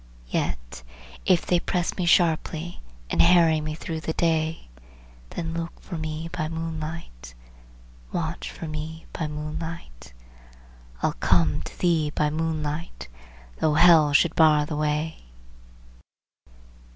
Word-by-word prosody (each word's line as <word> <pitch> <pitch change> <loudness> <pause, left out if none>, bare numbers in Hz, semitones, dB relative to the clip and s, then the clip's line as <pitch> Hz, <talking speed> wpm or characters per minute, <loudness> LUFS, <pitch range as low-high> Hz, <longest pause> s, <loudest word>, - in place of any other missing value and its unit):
Yet - - -3 0.5
if 185 -3 +4
they 175 - +3
press 175 0 -1
me 180 -2 -1
sharply, 170 0 +2 0.3
and - - +4
harry 170 -3 +5
me 155 0 -4
through 160 0 -5
the 160 0 -3
day, 160 - 0 0.6
Then 165 -1 -4
look 165 0 -5
for - - -8
me 160 0 -4
by 175 -3 -2
moonlight, 160 - -6 0.8
Watch - - -3
for 165 - -7
me 155 +1 -6
by 160 - -2
moonlight, 150 - -7 0.9
I'll - - +2
come 80 -4 +2
to - - -9
thee 165 -4 +2
by 150 0 0
moonlight, 155 - -3 0.5
though 155 -1 +2
hell 160 -3 +7
should 160 +3 +4
bar 155 -2 +5
the 150 - -4
way." 150 +1 -1
160 Hz, 125 wpm, -25 LUFS, 150-165 Hz, 0.9 s, hell